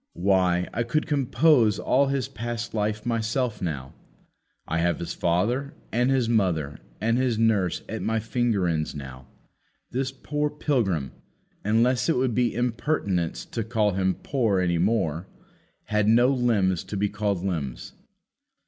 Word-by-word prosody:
Why, 90 -1 +2
I 120 - -1
could 125 +6 0
compose 135 -5 +3
all 140 +6 +2
his 135 -2 -1
past 120 +1 -5
life 105 0 -1
myself 115 +1 -1
now. 70 -7 -4 0.7
I 80 - -1
have 85 -1 +1
his 85 - -5
father 115 +12 0 0.2
and 125 +3 +2
his 130 -3 +2
mother 90 -11 0 0.2
and 115 +2 +1
his 125 -4 +1
nurse 105 -6 +1
at - - -5
my 115 0 0
finger 110 -4 0
ends 80 -3 -1
now. 65 -2 -9 0.6
This 130 +1 -1
poor 150 +3 -2
pilgrim 115 - -1 0.5
unless 120 +7 +2
it 165 - +2
would 125 -1 +1
be 120 -1 +1
impertinence 115 - -1
to 115 - -4
call 110 -2 +1
him 95 0 0
poor 115 -9 +1
any 85 -2 +1
more 95 -4 0 0.6
had 105 -1 0
no 120 +3 +5
limbs 110 -9 +1
to 105 - -5
be 105 +1 +1
called 100 -3 -2
limbs. 70 -10 -4
110 Hz, 150 wpm, -25 LUFS, 90-125 Hz, 0.7 s, no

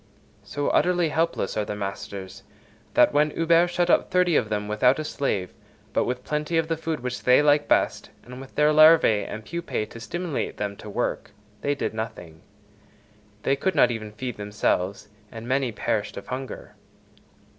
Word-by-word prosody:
So 105 +9 -3
utterly 175 -2 +2
helpless 160 -9 -1
are 105 - 0
the 105 - -5
masters, 100 -1 -6 0.5
that - - +5
when 150 +1 +3
Huber 165 +2 +3
shut 175 0 0
up - - +3
thirty 180 -2 +2
of 110 -6 +2
them 105 -1 -2
without 115 +5 +3
a 155 - -3
slave, 105 - -2 0.4
but - - +2
with 125 0 -3
plenty 150 +2 -1
of 165 -1 +1
the 165 - +1
food 160 -2 -4
which 125 0 -4
they 125 +3 +5
like 145 0 +3
best, - - +1
and 125 +1 -10
with 135 - -13
their 150 0 +4
larvæ 155 -9 +5
and 110 0 -7
pupæ 170 -10 -3
to 115 - -9
stimulate 175 +5 -4
them 100 -1 -3
to 105 - -10
work, 120 +4 -2 0.3
they 145 0 0
did - - -3
nothing; 100 -8 -7 1.0
they 135 - +2
could 185 +7 -1
not 125 - +5
even 110 -2 -5
feed 125 +2 -6
themselves, 100 -2 -1 0.2
and 115 +1 -8
many 130 -1 +1
perished 105 -1 -2
of 100 - -9
hunger. 130 +1 -6
130 Hz, 175 wpm, -25 LUFS, 105-155 Hz, 1.0 s, that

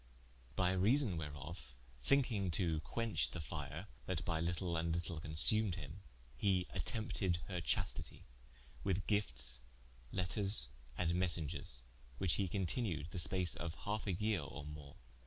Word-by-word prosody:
By 90 +2 +3
reason 105 +3 +3
whereof, 70 -5 -6 0.3
thincking 115 - +3
to 85 -4 +1
quench 115 +7 0
the 90 - -6
fire, 75 +2 -4 0.2
that 90 -2 -1
by 80 -2 +1
litle 85 +1 0
and 80 0 0
litle 85 -1 -3
consumed 85 +6 +3
him, 80 +2 -7 0.3
he 90 +5 +2
attempted 100 -1 0
her 90 -3 -2
chastity, 95 +4 -1 0.6
with 95 -1 0
giftes, 65 - +1 0.5
letters, 95 +3 +3 0.3
and 85 -1 +2
messengers, 85 -7 +1 0.4
which 85 +4 +2
he 95 - +1
continued 90 - 0
the 90 - -3
space 85 +2 +2
of 85 -1 -4
halfe 105 +1 -1
a 95 - +2
yeare 105 0 +1
or 70 0 -7
more. 75 -2 -8
90 Hz, 140 wpm, -38 LUFS, 80-100 Hz, 0.6 s, By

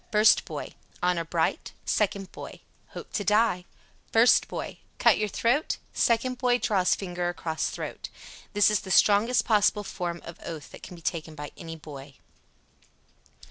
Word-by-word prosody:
First 210 0 +5
boy: - - -6 0.3
"Honor 180 -1 +2
bright?" 165 0 -1
Second 200 -2 0
boy: - - -9 0.3
"Hope - - -9
to 205 - -1
die." 210 -3 +2 0.5
First 230 +2 +5
boy: - - -6 0.2
"Cut - - +4
your 215 - +1
throat?" 245 +10 +1 0.2
Second 245 +2 +1
boy 250 -1 +3
draws 190 -7 +2
finger 180 -2 -3
across 160 -2 -2
throat. - - -6 0.4
This 205 +1 +5
is 210 - +2
the 200 - -10
strongest 210 +6 +4
possible 210 -1 +3
form 175 -3 -4
of 170 - -9
oath 160 -4 -7
that - - -12
can 180 - -10
be 170 - -14
taken 160 -2 -3
by 145 -1 -7
a 165 -3 -8
boy. 145 -3 -11
190 Hz, 155 wpm, -27 LUFS, 170-215 Hz, 0.5 s, First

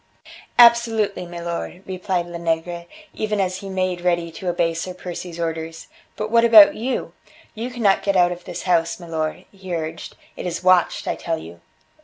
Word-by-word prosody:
"Absolutely, 230 -6 +4
milor," 170 +1 -5
replied 185 -1 -2
Lenegre, 170 0 -3 0.3
even 215 -1 -2
as 185 -1 0
he 195 - -8
made 185 -2 -1
ready 170 -1 0
to 180 +3 -8
obey 170 -1 +1
Sir 180 +2 -5
Percy's 175 -1 -7
orders, 165 -1 -4 0.3
"but 215 0 -4
what 230 0 +5
about 225 -3 +9
you? 250 +4 -3 0.4
You 230 +2 -5
cannot 225 -6 +2
get 200 -1 0
out 180 -1 +4
of 175 0 -7
this 180 -2 -6
house, 170 -2 +1
milor," 165 0 -4
he 190 -3 -6
urged; 160 -1 -5 0.2
"it - - -5
is 170 +1 -4
watched, 185 -1 +3
I - - +1
tell 165 -1 -3
you." 85 - -11
180 Hz, 170 wpm, -22 LUFS, 170-195 Hz, 0.4 s, about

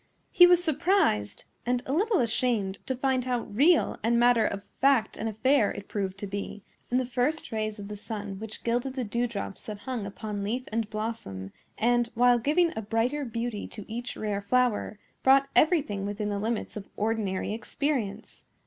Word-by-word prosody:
He 355 - +8
was 355 0 +5
surprised 315 - +1 0.2
and 245 0 0
a 265 - -2
little 405 - +2
ashamed 225 -4 0
to 260 - -1
find 260 -1 0
how 250 -2 0
real 285 - +3
and 235 +1 +3
matter 240 -2 +5
of 200 0 -4 0.2
fact 270 -5 +3
an 225 - -3
affair 225 +1 +3
it 200 - -8
proved 195 -2 -3
to 205 - -5
be, 200 +1 -5 0.3
in 245 - +2
the 255 - +1
first 255 +6 -1
rays 215 -1 -2
of 200 -1 -7
the 210 - -6
sun 205 -2 -6
which 220 0 -7
gilded 245 +3 -1
the 260 - -1
dew 235 +3 -1
drops 200 -4 -5
that 210 -2 -6
hung 245 -6 -4
upon 205 0 -5
leaf 235 +6 -2
and 225 -1 -1
blossom, 215 - -5 0.3
and, 240 +1 +2
while 245 +1 +5
giving 325 +7 +2
a 220 - -2
brighter 230 +7 0
beauty 230 -3 -3
to 210 - -9
each 240 +3 -5
rare 205 -2 -2
flower, 235 0 +1 0.2
brought 270 +1 +5
everything 295 - +3
within 205 +1 -3
the 200 -1 -2
limits 225 +2 -2
of 205 -2 -7
ordinary 210 -2 -1
experience. 225 -3 -3
230 Hz, 185 wpm, -28 LUFS, 205-255 Hz, 0.3 s, He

